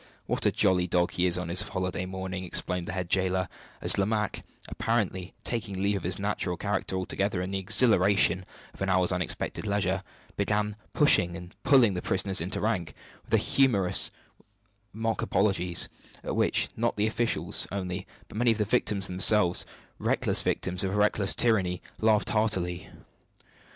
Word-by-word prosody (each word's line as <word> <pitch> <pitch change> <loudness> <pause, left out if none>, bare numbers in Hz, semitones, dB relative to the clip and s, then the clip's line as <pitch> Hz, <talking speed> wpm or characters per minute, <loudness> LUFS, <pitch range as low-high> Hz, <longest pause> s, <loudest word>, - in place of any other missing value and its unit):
what - - 0
a - - +3
jolly 90 -1 +2
dog 90 0 +1
he 90 +1 +1
is 90 0 +1
on 90 -1 -4
his 90 +2 +3
holiday 90 -1 -3
morning!" 95 0 -5
exclaimed 90 0 -3
the - - -3
head 90 -2 -3
jailer, 95 0 +1 0.4
as - - +6
Lomaque 105 +1 -1 0.3
apparently 95 -5 -2
taking 105 -5 -3
leave 100 +1 +1
of - - -6
his 90 +1 0
natural 100 -3 -2
character 100 -1 -2
altogether 95 +1 -2
in 90 +1 -4
the 95 - -1
exhilaration 100 -3 +4 0.3
of - - -17
an 95 - -1
hour's 90 0 +2
unexpected 90 +4 -3
leisure 95 -2 0 0.4
began 105 0 0 0.2
pushing 90 - +4
and 90 +1 -10
pulling 125 -7 +4
the 90 - -3
prisoners 95 -2 0
into 90 +4 -3
rank, 90 -9 -2 0.3
with - - +3
humorous 105 -10 +2 0.8
mock 115 +1 -2
apologies, 90 -4 +1 0.4
at - - -3
which - - +2
not 115 +1 -1
the 105 - +1
officials 115 +2 0
only, 95 -1 -4 0.2
but - - -10
many 120 +1 +3
of - - -7
the 105 - 0
victims 105 -3 0
themselves 90 0 +3 0.3
reckless - - +1
victims 90 +1 -1
of 95 - -1
a - - -1
reckless 105 -1 +2
tyranny 95 -7 +2 0.2
laughed 110 -1 +2
heartily. 95 -4 0
95 Hz, 160 wpm, -27 LUFS, 90-105 Hz, 0.8 s, as